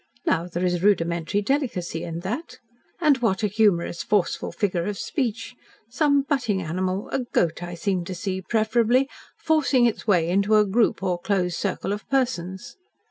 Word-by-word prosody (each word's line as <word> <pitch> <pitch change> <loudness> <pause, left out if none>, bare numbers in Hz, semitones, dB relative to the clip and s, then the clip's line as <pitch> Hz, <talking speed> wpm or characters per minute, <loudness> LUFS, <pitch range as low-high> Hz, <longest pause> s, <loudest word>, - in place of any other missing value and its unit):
Now, 170 +2 +1
there 175 +1 -2
is 175 -1 0
rudimentary 170 -1 +1
delicacy 205 - -1
in 170 0 -5
that. 250 - -5 0.4
And 295 -5 +4
what 225 -3 0
a - - +4
humorous, 195 -5 +1
forceful 200 -3 0
figure 180 -5 -1
of 205 0 -3
speech! 230 -3 -3 0.4
Some 285 0 +3
butting 255 -9 0
animal 185 +3 -2
a - - -1
goat, 180 -10 0
I 175 0 -5
seem 185 0 -1
to 185 - -5
see, 190 0 -3
preferably 230 +5 +2 0.3
forcing 295 -6 +3
its 230 -1 -1
way 175 -6 +3
into 200 +4 +2
a 210 0 +5
group 210 -1 +1
or 180 -2 0
closed 180 -2 0
circle 195 0 -2
of 210 - -7
persons." 190 -9 -2
200 Hz, 165 wpm, -24 LUFS, 180-235 Hz, 0.4 s, a